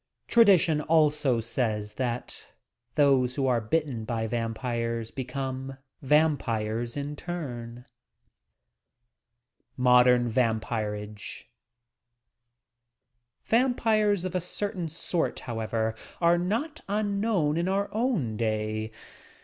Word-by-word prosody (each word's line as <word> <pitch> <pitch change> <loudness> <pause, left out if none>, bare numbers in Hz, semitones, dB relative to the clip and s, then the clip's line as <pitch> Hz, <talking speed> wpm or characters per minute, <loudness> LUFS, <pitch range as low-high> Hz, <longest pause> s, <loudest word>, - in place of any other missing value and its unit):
Tradition 185 -9 +5
also 150 -5 +3
says 110 -2 -2
that 125 0 -4 0.4
those 135 -4 +3
who 140 - 0
are 125 -3 +2
bitten 130 -1 -1
by 110 0 -2
vampires 115 0 -2
become 130 0 -5 0.3
vam 150 +2 +4
pires 115 +2 -2
in 145 +1 -4
turn, 125 -8 -6 1.9
MODERN 125 -1 +5
VAMPIRAOE 110 -3 -2 2.0
Vampires 220 -5 +2
of 185 - -3
a 185 - 0
certain 180 -1 -3
sort, 165 +1 -2
however, 110 -1 -2 0.3
are 170 0 +4
not 235 - -2
unknown 200 -6 +1
in 170 +2 0
our 200 +1 +1
own 215 - 0
day. 110 0 -1
130 Hz, 95 wpm, -27 LUFS, 115-175 Hz, 2.0 s, Tradition